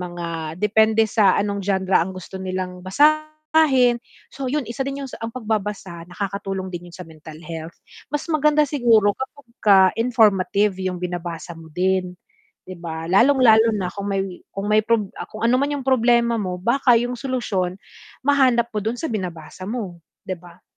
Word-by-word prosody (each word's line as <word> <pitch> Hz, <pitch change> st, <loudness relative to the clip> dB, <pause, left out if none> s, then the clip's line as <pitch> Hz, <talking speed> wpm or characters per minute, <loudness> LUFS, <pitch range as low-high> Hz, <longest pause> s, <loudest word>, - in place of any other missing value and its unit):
mga 170 Hz, -3 st, -5 dB
depende 220 Hz, +2 st, +3 dB
sa 205 Hz, -3 st, +3 dB
anong 200 Hz, 0 st, -1 dB
genre 190 Hz, -1 st, 0 dB
ang 175 Hz, +3 st, -2 dB
gusto 185 Hz, +1 st, -10 dB
nilang 185 Hz, -1 st, -4 dB
basahin. 310 Hz, 0 st, +3 dB, 0.4 s
So 270 Hz, -1 st, -4 dB
yun, 285 Hz, -4 st, -1 dB
isa 270 Hz, +3 st, -2 dB
din 275 Hz, 0 st, -4 dB
yung -, -, -11 dB
ang 225 Hz, -, -3 dB
pagbabasa, 210 Hz, -6 st, -3 dB
nakakatulong 195 Hz, 0 st, -4 dB
din 175 Hz, 0 st, -7 dB
yun -, -, -15 dB
sa 180 Hz, -, -8 dB
mental 155 Hz, -1 st, -12 dB
health. 165 Hz, 0 st, -7 dB, 0.4 s
Mas 295 Hz, +1 st, -3 dB
maganda 300 Hz, -1 st, +3 dB
siguro 230 Hz, -7 st, +3 dB
kapagka 235 Hz, -8 st, +2 dB
informative 210 Hz, -4 st, +2 dB
yung 185 Hz, -1 st, -2 dB
binabasa 175 Hz, -1 st, -5 dB
mo 165 Hz, -, -12 dB
din. 185 Hz, 0 st, 0 dB, 0.5 s
Di 185 Hz, -, -8 dB
ba? 160 Hz, -1 st, -6 dB
Lalong-lalo 230 Hz, +3 st, +5 dB
na 180 Hz, -1 st, -3 dB
kung 200 Hz, 0 st, -4 dB
may 195 Hz, -1 st, 0 dB, 0.3 s
kung 195 Hz, 0 st, -5 dB
may 215 Hz, 0 st, +4 dB
prob 215 Hz, -3 st, 0 dB, 0.2 s
kung 215 Hz, -, -9 dB
ano 235 Hz, -, +3 dB
man 280 Hz, -, +1 dB
yung 275 Hz, -2 st, -4 dB
problema 235 Hz, -2 st, +3 dB
mo, 185 Hz, -4 st, -3 dB
baka 240 Hz, +5 st, +3 dB
yung 245 Hz, +2 st, -1 dB
solusyon, 205 Hz, -9 st, -2 dB, 0.5 s
mahanap 255 Hz, -5 st, +3 dB
mo 210 Hz, -, 0 dB
dun 225 Hz, +4 st, -2 dB
sa 325 Hz, -, -4 dB
binabasa 185 Hz, -2 st, -6 dB
mo, 200 Hz, -8 st, -5 dB, 0.2 s
di 185 Hz, -, -2 dB
ba? 175 Hz, +1 st, -17 dB
205 Hz, 165 wpm, -22 LUFS, 180-245 Hz, 0.5 s, Lalong-lalo